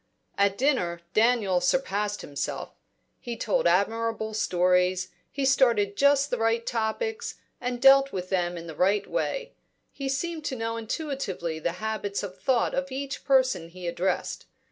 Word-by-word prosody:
At 200 0 +2
dinner, 180 -12 +1
Daniel 215 -5 +3
surpassed 205 0 0
himself. 140 -1 -4 0.5
He 240 -1 -6
told 210 -5 +1
admirable 220 +4 +1
stories, 180 -2 +2 0.2
he 280 -1 -2
started 235 -7 +3
just 280 +3 +3
the 250 - 0
right 225 +1 +1
topics, 435 - -2 0.3
and 245 0 -2
dealt 275 +1 +7
with 185 -1 -4
them 175 -2 0
in 170 - -7
the 165 - -7
right 195 +6 +2
way; - - -2 0.4
he 275 -1 -4
seemed 315 +4 -2
to 265 - -2
know 230 -1 -2
intuitively 220 - -3
the 170 +1 -1
habits 210 0 -3
of 190 -2 -7
thought 240 +3 +2
of 275 0 -2
each 275 +1 -4
person 260 - +2
he 180 +1 -10
addressed. 175 +2 -2
220 Hz, 150 wpm, -27 LUFS, 185-270 Hz, 0.5 s, dealt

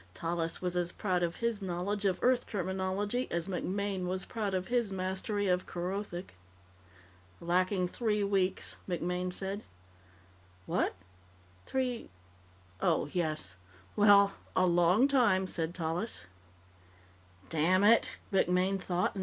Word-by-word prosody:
Tallis 165 +1 -2
was 180 -1 -1
as 175 0 0
proud 185 -4 -1
of 170 -1 0
his 235 -3 -1
knowledge 195 +3 -2
of 190 -2 +2
Earth 250 0 +3
terminology 190 +5 -1
as 170 +1 -1
MacMaine 195 0 -2
was 185 +1 -1
proud 210 -4 -2
of 185 +2 -2
his 240 -4 +1
mastery 190 +2 -1
of 180 0 +1
Kerothic. 180 +1 -4 1.1
"Lacking 180 +2 +1
three 210 +1 0
weeks," 195 -2 0
MacMaine 180 +1 -1
said. 195 +3 -2 1.0
"What? - - 0 0.7
Three... 255 -3 -2 0.7
oh, - - +1
yes. 155 - 0 0.4
Well. 200 -1 +6 0.2
A 185 - +4
long 175 +7 +4
time," 235 -9 +3
said 170 -2 -2
Tallis. 170 - -2
185 Hz, 105 wpm, -31 LUFS, 175-205 Hz, 1.1 s, Well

